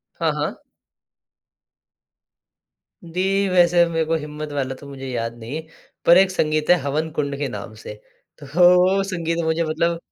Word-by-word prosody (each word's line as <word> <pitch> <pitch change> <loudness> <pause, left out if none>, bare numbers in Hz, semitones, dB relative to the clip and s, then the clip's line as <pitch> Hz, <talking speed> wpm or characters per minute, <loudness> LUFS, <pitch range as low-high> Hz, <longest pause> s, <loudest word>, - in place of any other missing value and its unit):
हाँ, - - 0
हाँ। - - -3 2.5
दी, 190 +3 0
वैसे 175 -1 +4
मेरे 165 -1 0
को 165 +1 -1
हिम्मत 150 0 -7
वाला 135 -2 -2
तो 140 - -13
मुझे 135 -1 -8
याद 115 -2 -3
नहीं 120 +6 -6
है। 160 - -6 0.4
पर 170 - +8
एक 190 0 +4
संगीत 155 -3 0
है 180 - +7
हवन 150 +4 -2
कुंड 140 -1 -1
के 145 -1 -2
नाम 105 0 -7
से। - - -8 0.4
तो 145 - -11
वो 180 +2 +5
संगीत 170 -3 -3
मुझे 160 +1 0
मतलब 165 +2 0
160 Hz, 160 wpm, -21 LUFS, 140-175 Hz, 2.5 s, पर